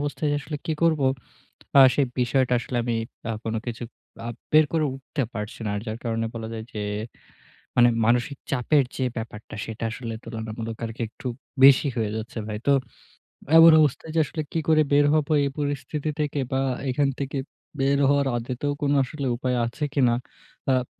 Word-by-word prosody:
অবস্থায় 145 Hz, +1 st, -1 dB
আসলে 150 Hz, +1 st, -5 dB
কি 160 Hz, -, 0 dB
করবো? 160 Hz, -4 st, +3 dB, 0.7 s
অ্যা 140 Hz, -, +8 dB
সেই 140 Hz, -, +2 dB
বিষয়টা 125 Hz, +1 st, +2 dB
আসলে 120 Hz, +1 st, -5 dB
আমি 120 Hz, -1 st, 0 dB, 0.3 s
অ্যা 115 Hz, -, -2 dB
কোন 115 Hz, -, -2 dB
কিছু 120 Hz, 0 st, -5 dB, 0.4 s
আ -, -, -3 dB, 0.2 s
বের 155 Hz, 0 st, +7 dB
করে 160 Hz, -2 st, +2 dB
উঠতে 135 Hz, +2 st, -4 dB
পারছি 105 Hz, -1 st, -5 dB
না। 105 Hz, -, -1 dB
আর 105 Hz, -, -2 dB
যার 110 Hz, 0 st, -4 dB
কারণে 115 Hz, -1 st, -1 dB
বলা 115 Hz, -1 st, -5 dB
যায় 110 Hz, -1 st, -5 dB
যে 105 Hz, -, -4 dB, 1.0 s
মানে 120 Hz, 0 st, +6 dB, 0.2 s
মানসিক 120 Hz, +4 st, +1 dB
চাপের 140 Hz, +2 st, +3 dB
যে 130 Hz, -, 0 dB
ব্যাপারটা 110 Hz, -1 st, -7 dB
সেটা 110 Hz, 0 st, -6 dB
আসলে 115 Hz, 0 st, -5 dB
তুলনামূলক 110 Hz, 0 st, -5 dB
আরকি 115 Hz, +1 st, -6 dB
একটু 125 Hz, -, -8 dB, 0.4 s
বেশি 135 Hz, +2 st, +8 dB
হয়ে 110 Hz, -2 st, 0 dB
যাচ্ছে 110 Hz, +2 st, -6 dB
ভাই। 105 Hz, -1 st, -3 dB
তো -, -, +6 dB, 0.9 s
এমন 165 Hz, 0 st, +10 dB
অবস্থায় 150 Hz, +1 st, +1 dB
যে 165 Hz, -, +3 dB
আসলে 155 Hz, +2 st, -4 dB
কি -, -, 0 dB
করে 155 Hz, -1 st, +5 dB
বের 145 Hz, +1 st, +5 dB
হব 155 Hz, -2 st, +2 dB, 0.2 s
এই -, -, +1 dB
পরিস্থিতি 145 Hz, +1 st, -2 dB
থেকে? 150 Hz, -1 st, -1 dB
বা 130 Hz, -, +2 dB, 0.3 s
এখান 140 Hz, +2 st, +2 dB
থেকে 140 Hz, 0 st, -2 dB, 0.4 s
বের 140 Hz, +1 st, +3 dB
হওয়ার 140 Hz, 0 st, +3 dB
আদতেও 125 Hz, +4 st, -2 dB
কোন 145 Hz, -1 st, +2 dB
আসলে 140 Hz, +1 st, -4 dB
উপায় 125 Hz, 0 st, -1 dB
আছে 120 Hz, +6 st, -3 dB
কিনা? 125 Hz, -4 st, +4 dB, 0.5 s
অ্যাপ 130 Hz, -2 st, +2 dB
130 Hz, 175 wpm, -25 LUFS, 115-145 Hz, 1.0 s, এমন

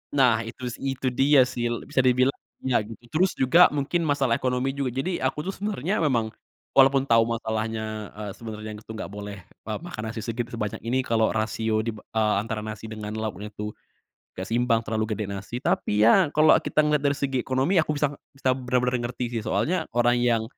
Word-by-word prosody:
Nah 125 Hz, -5 st, +5 dB
itu 120 Hz, +2 st, -9 dB
sih 135 Hz, +3 st, -3 dB
itu 130 Hz, 0 st, -3 dB
dia 135 Hz, +1 st, +5 dB
sih, 120 Hz, -1 st, -2 dB, 0.2 s
bisa -, -, 0 dB
dibilang 130 Hz, +1 st, +4 dB, 0.3 s
ya 130 Hz, -3 st, +3 dB
gitu, 110 Hz, +1 st, -9 dB
terus 185 Hz, +4 st, +3 dB
juga 165 Hz, +8 st, +6 dB
mungkin 160 Hz, +4 st, 0 dB
masalah 140 Hz, -4 st, +2 dB
ekonomi 130 Hz, +1 st, 0 dB
juga. 135 Hz, -2 st, -2 dB
Jadi, 175 Hz, +6 st, -1 dB
aku 135 Hz, +3 st, -1 dB
tuh 195 Hz, -, -2 dB
sebenernya 200 Hz, -1 st, -2 dB
memang, 120 Hz, -8 st, +1 dB, 0.4 s
walaupun 135 Hz, 0 st, +5 dB
tau 115 Hz, -4 st, +4 dB
masalahnya, 110 Hz, -2 st, -3 dB
eee, 105 Hz, -1 st, -5 dB
sebenernya 110 Hz, -2 st, -7 dB
yang 105 Hz, -, -9 dB
itu 110 Hz, -, -11 dB
gak 110 Hz, -, -6 dB
boleh, 100 Hz, 0 st, -7 dB, 0.3 s
eee, 110 Hz, -, -2 dB
makan 175 Hz, -11 st, -6 dB
nasi 110 Hz, 0 st, -5 dB
segitu 120 Hz, 0 st, -3 dB
sebanyak 105 Hz, -3 st, -3 dB
ini 130 Hz, +2 st, +1 dB
kalo 110 Hz, -3 st, +2 dB
rasio 110 Hz, 0 st, 0 dB
dib 110 Hz, -2 st, -4 dB
eee, 110 Hz, -1 st, 0 dB
antara 110 Hz, 0 st, -4 dB
nasi 110 Hz, 0 st, -6 dB
dengan 105 Hz, -1 st, -6 dB
lauknya 105 Hz, -1 st, -5 dB
tuh 105 Hz, 0 st, -6 dB, 0.6 s
gak 95 Hz, -, -4 dB
seimbang, 115 Hz, 0 st, +2 dB
terlalu 110 Hz, 0 st, -1 dB
gede 105 Hz, -, -2 dB
nasi. 100 Hz, +3 st, -6 dB
Tapi -, -, 0 dB
ya 165 Hz, -, +6 dB
kalo 155 Hz, +1 st, +6 dB
kita -, -, -1 dB
ngeliat 150 Hz, -1 st, +1 dB
dari 140 Hz, -1 st, +2 dB
segi 135 Hz, -2 st, -1 dB
ekonomi, 130 Hz, +9 st, 0 dB
aku 155 Hz, -, -2 dB
bisa 150 Hz, -, +2 dB, 0.2 s
bisa 135 Hz, -1 st, -2 dB
bener-bener 125 Hz, -1 st, 0 dB
ngerti 120 Hz, 0 st, -4 dB
sih. 115 Hz, -, -1 dB
Soalnya 180 Hz, +11 st, 0 dB
orang 120 Hz, 0 st, +4 dB
yang 120 Hz, -2 st, +2 dB
120 Hz, 195 wpm, -25 LUFS, 110-135 Hz, 0.6 s, juga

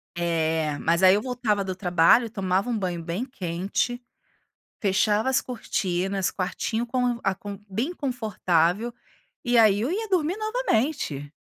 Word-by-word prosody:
É, 160 Hz, -3 st, 0 dB
mas 170 Hz, +2 st, +1 dB
aí 185 Hz, 0 st, +7 dB
eu 210 Hz, -, 0 dB
voltava 235 Hz, -6 st, 0 dB
do 185 Hz, -1 st, -4 dB
trabalho, 180 Hz, +5 st, +4 dB
tomava 195 Hz, +1 st, -1 dB
um 230 Hz, -, 0 dB
banho 180 Hz, -4 st, -3 dB
bem 175 Hz, +9 st, -3 dB
quente, 195 Hz, +2 st, -2 dB, 0.8 s
fechava 210 Hz, +4 st, +2 dB
as 265 Hz, -, +3 dB
cortinas, 195 Hz, -5 st, -2 dB
quartinho 220 Hz, +5 st, -2 dB
com 245 Hz, -1 st, 0 dB
a 195 Hz, -, +2 dB
com 200 Hz, +1 st, -8 dB
bem 255 Hz, -, -2 dB
confortável, 215 Hz, -, 0 dB, 0.5 s
e 240 Hz, 0 st, +2 dB
aí, 210 Hz, -2 st, +5 dB
eu 245 Hz, -, -1 dB
ia 435 Hz, +5 st, -2 dB
dormir 360 Hz, -2 st, +1 dB
novamente. 295 Hz, -, -1 dB
205 Hz, 140 wpm, -25 LUFS, 180-245 Hz, 0.8 s, aí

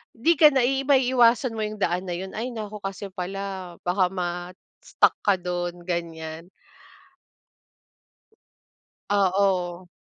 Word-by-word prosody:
'di 320 Hz, +9 st, +3 dB
ka 305 Hz, -, +9 dB
na 265 Hz, -3 st, +2 dB
ba 270 Hz, +1 st, +2 dB
maiiwasan 245 Hz, -1 st, +3 dB
mo 220 Hz, -, -4 dB
'yung 215 Hz, 0 st, -3 dB
daan 180 Hz, -1 st, -1 dB
na 175 Hz, -, -2 dB
'yun. 190 Hz, +1 st, -7 dB
Ay 235 Hz, +4 st, -3 dB
naku 215 Hz, -3 st, -7 dB
kasi 195 Hz, 0 st, -6 dB
pala 190 Hz, -1 st, -5 dB
baka 180 Hz, 0 st, +2 dB
ma-stuck 180 Hz, -1 st, -1 dB
ka 200 Hz, -2 st, +3 dB
dun, 175 Hz, -1 st, -4 dB
ganyan. 165 Hz, -1 st, -5 dB, 2.6 s
Oo. 185 Hz, -3 st, +1 dB
190 Hz, 120 wpm, -25 LUFS, 175-220 Hz, 2.6 s, ka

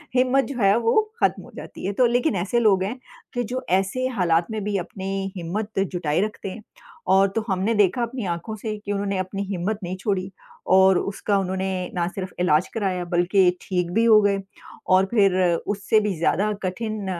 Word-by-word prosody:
हिम्मत 255 Hz, +2 st, +3 dB
जो 280 Hz, -, -6 dB
है 200 Hz, 0 st, +5 dB
वो 230 Hz, -, +3 dB, 0.2 s
खत्म -, -, +1 dB
हो -, -, -14 dB
जाती -, -, -9 dB
है 200 Hz, -, -1 dB
तो 250 Hz, +5 st, +3 dB
लेकिन 245 Hz, +1 st, +1 dB
ऐसे 195 Hz, +6 st, 0 dB
लोग 200 Hz, -5 st, +3 dB
हैं 225 Hz, +7 st, -4 dB, 0.3 s
कि 245 Hz, -, -1 dB
जो 255 Hz, +1 st, -3 dB
ऐसे 195 Hz, +7 st, -1 dB
हालात 175 Hz, -8 st, +1 dB
में 215 Hz, -2 st, -3 dB
भी 205 Hz, 0 st, -1 dB
अपनी 195 Hz, +1 st, -4 dB
हिम्मत 195 Hz, +5 st, -3 dB
जुटाये 175 Hz, -4 st, 0 dB
रखते 210 Hz, -2 st, -6 dB
हैं 215 Hz, +3 st, -9 dB, 0.5 s
और 195 Hz, +1 st, +5 dB
तो 225 Hz, -, 0 dB
हमने 195 Hz, +3 st, 0 dB
देखा 205 Hz, +2 st, +3 dB
अपनी 235 Hz, -1 st, -3 dB
आँखों 175 Hz, +5 st, -4 dB
से 215 Hz, 0 st, -5 dB
कि 205 Hz, -, -3 dB
उन्होंने 200 Hz, -1 st, -1 dB
अपनी 185 Hz, +2 st, -3 dB
हिम्मत 195 Hz, +2 st, -2 dB
नहीं 180 Hz, +1 st, -3 dB
छोड़ी 190 Hz, -1 st, -2 dB, 0.4 s
और 190 Hz, 0 st, +6 dB
उसका 200 Hz, +1 st, -1 dB
उन्होंने 190 Hz, -1 st, -2 dB
ना 170 Hz, -1 st, 0 dB
सिर्फ 185 Hz, 0 st, -6 dB
इलाज 175 Hz, -1 st, +3 dB
कराया 190 Hz, -5 st, -1 dB
बल्कि 175 Hz, +2 st, +3 dB
ठीक 180 Hz, -2 st, -2 dB
भी 225 Hz, +3 st, +3 dB
हो 220 Hz, -2 st, +7 dB
गए। 200 Hz, -1 st, +2 dB, 0.5 s
और 190 Hz, +1 st, +5 dB
फिर 200 Hz, -5 st, +4 dB, 0.3 s
उससे 210 Hz, +2 st, +2 dB
भी 210 Hz, -2 st, -1 dB
ज़्यादा 200 Hz, +6 st, +1 dB
कठिन 215 Hz, +2 st, -3 dB
195 Hz, 190 wpm, -23 LUFS, 185-215 Hz, 0.5 s, हो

